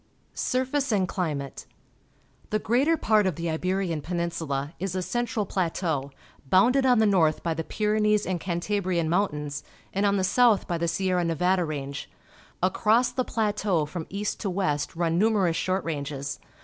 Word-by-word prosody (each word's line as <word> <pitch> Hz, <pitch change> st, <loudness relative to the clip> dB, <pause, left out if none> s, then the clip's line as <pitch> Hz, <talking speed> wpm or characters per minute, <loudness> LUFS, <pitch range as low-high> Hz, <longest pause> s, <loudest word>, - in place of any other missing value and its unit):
Surface 260 Hz, +1 st, 0 dB
and 195 Hz, -3 st, +2 dB
Climate. 150 Hz, -7 st, -3 dB, 0.4 s
— -, -, -34 dB
The 215 Hz, -, +1 dB
greater 270 Hz, +10 st, +2 dB
part 215 Hz, -6 st, +3 dB
of 180 Hz, -, -1 dB
tlie 165 Hz, 0 st, -2 dB
Ibeiian 185 Hz, -4 st, -1 dB
Peninsula 165 Hz, -4 st, -3 dB
is 190 Hz, 0 st, -3 dB
a 185 Hz, -, -1 dB
central 240 Hz, -1 st, -1 dB
plateau, 165 Hz, -6 st, -1 dB, 0.4 s
bounded 250 Hz, +8 st, +4 dB
on 250 Hz, -1 st, +5 dB
the 220 Hz, -, +4 dB
north 170 Hz, -7 st, +3 dB
by 165 Hz, -, 0 dB
the 165 Hz, 0 st, -3 dB
Pyrenees 210 Hz, +2 st, +1 dB
and 180 Hz, -2 st, -1 dB
Cantabrian 180 Hz, -2 st, -1 dB
Mountains 150 Hz, -6 st, -1 dB, 0.3 s
and 195 Hz, -, 0 dB
on 200 Hz, 0 st, +3 dB
the 190 Hz, -, +1 dB
south 225 Hz, +2 st, +4 dB
by 170 Hz, -1 st, -1 dB
the 170 Hz, -, 0 dB
Sierra 185 Hz, 0 st, +1 dB
Nevada 180 Hz, +2 st, +1 dB
Range. 140 Hz, -2 st, -5 dB, 0.5 s
Across 220 Hz, +6 st, +3 dB
the 255 Hz, -, 0 dB
pla 220 Hz, -3 st, 0 dB
teau 190 Hz, -7 st, 0 dB
from 160 Hz, +1 st, -6 dB
east 205 Hz, +1 st, -3 dB
to 200 Hz, -, -2 dB
west 175 Hz, -7 st, -1 dB
run 165 Hz, 0 st, +1 dB
numerous 200 Hz, -6 st, +3 dB
short 185 Hz, +2 st, 0 dB
ranges. 140 Hz, -3 st, -4 dB
185 Hz, 165 wpm, -26 LUFS, 165-210 Hz, 0.5 s, on